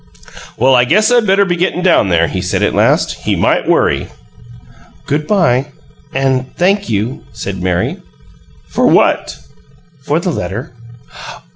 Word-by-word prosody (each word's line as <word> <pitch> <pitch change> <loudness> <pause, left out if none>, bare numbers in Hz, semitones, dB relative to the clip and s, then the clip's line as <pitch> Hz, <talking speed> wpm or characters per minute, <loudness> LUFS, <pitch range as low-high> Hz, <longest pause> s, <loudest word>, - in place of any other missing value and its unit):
"Well, 130 +3 +3
I 125 -1 +5
guess 215 - +2
I 245 - +5
better 200 -2 +2
be 175 -2 -1
gettin' 180 0 -1
down 170 - +3
there," 85 -1 +3
he 95 - -4
said, 90 - -1
at - - +1
last. - - +2
"He - - 0
might - - 0
worry." - - +1 1.0
"Good 150 +1 -2
by 145 -10 +2 0.4
and 130 -2 -1
thank 195 +3 +1
you," 110 +4 -2
said 100 -3 -6
Mary. 90 -1 -1 0.7
"For - - 0
what?" - - +2 0.7
"For 150 +2 0
the 180 +1 -2
letter." 105 - -5
135 Hz, 145 wpm, -14 LUFS, 110-180 Hz, 1.0 s, I